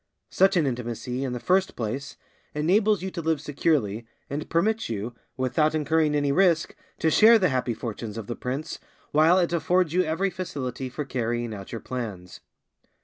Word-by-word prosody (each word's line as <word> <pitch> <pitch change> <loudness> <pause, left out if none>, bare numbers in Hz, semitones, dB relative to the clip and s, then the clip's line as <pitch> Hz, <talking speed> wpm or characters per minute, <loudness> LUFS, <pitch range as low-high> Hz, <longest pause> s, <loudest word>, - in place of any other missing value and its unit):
Such 190 -1 +4
an 160 - +3
intimacy, 125 0 -3
in 130 -2 -2
the 125 - -3
first 185 +7 +1
place, 125 +5 -4 0.4
enables 195 +6 +2
you 190 - -3
to 170 - -4
live 160 -1 0
securely, 135 -7 0 0.2
and 150 +2 -4
permits 215 - +1
you, 115 +2 -4 0.2
without 130 +5 +1
incurring 155 0 +2
any 145 -1 +1
risk, 170 0 +2 0.2
to 160 - +1
share 225 +7 +7
the 185 -5 +2
happy 125 -3 -1
fortunes 115 -1 -6
of 110 - -5
the 120 - -4
prince, 135 +6 -4 0.3
while 160 +4 +5
it 175 -2 +1
affords 170 0 +1
you 180 - +4
every 185 +4 0
facility 135 -8 -4
for 145 +4 -5
carrying 120 -3 -2
out 100 -2 -8
your 115 - -5
plans. 105 -8 -6
145 Hz, 175 wpm, -26 LUFS, 120-170 Hz, 0.4 s, share